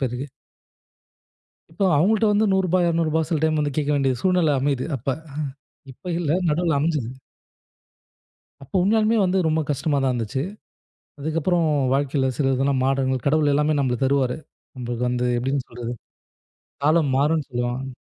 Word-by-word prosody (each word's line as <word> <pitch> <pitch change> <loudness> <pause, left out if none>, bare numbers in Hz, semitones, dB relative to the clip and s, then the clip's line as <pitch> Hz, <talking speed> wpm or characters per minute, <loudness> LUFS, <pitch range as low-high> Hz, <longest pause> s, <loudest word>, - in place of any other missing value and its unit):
பேருக்கு 130 +1 -2 1.5
இப்போ 195 +4 -1
அவங்கள்ட்ட 215 +8 +3
வந்து 210 +1 +3
ரூ.100 185 -2 +2
ரூ.200 160 -1 +1
சில 165 - 0
டைம் 155 -1 +1
வந்து 145 -2 -2
கேட்க 150 0 0
வேண்டிய 135 -2 +1
சூழ்நிலை 180 -5 +3
அமையுது 135 -2 0
அப்ப. 130 +3 -9 0.8
இப்ப 180 +7 -7
இல்ல 155 -4 -1 0.2
நடுவுல 160 -1 +1
அமைஞ்சது. 150 -6 -1 1.5
அப்போ 135 - -15
உண்மையாலுமே 220 +3 +3
வந்து 185 +1 +1
ரொம்ப 160 0 +1
கஷ்டமா 145 +1 0
தான் 130 - +2
இருந்துச்சு. 125 +3 -2 0.8
அதுக்கப்புறம் 165 +3 0 0.3
வாழ்க்கையில 135 -1 +1
சில 135 -2 +2
இதெல்லாம் 135 0 +1
மாட 135 0 +1 0.2
கடவுள் 145 0 +3
எல்லாமே 150 +1 +2
நமக்கு 125 -2 -1
தருவாரு. 130 -2 +1 0.4
நமக்கு 120 -1 -4
வந்து 125 0 0
எப்படின்னு 135 +2 -1
சொல்றது. 120 0 -6 0.9
காலம் 155 -2 +3
மாறும்ன்னு 150 +1 +1
சொல்லுவாங்க. 125 +2 -3
145 Hz, 135 wpm, -23 LUFS, 130-165 Hz, 1.5 s, அவங்கள்ட்ட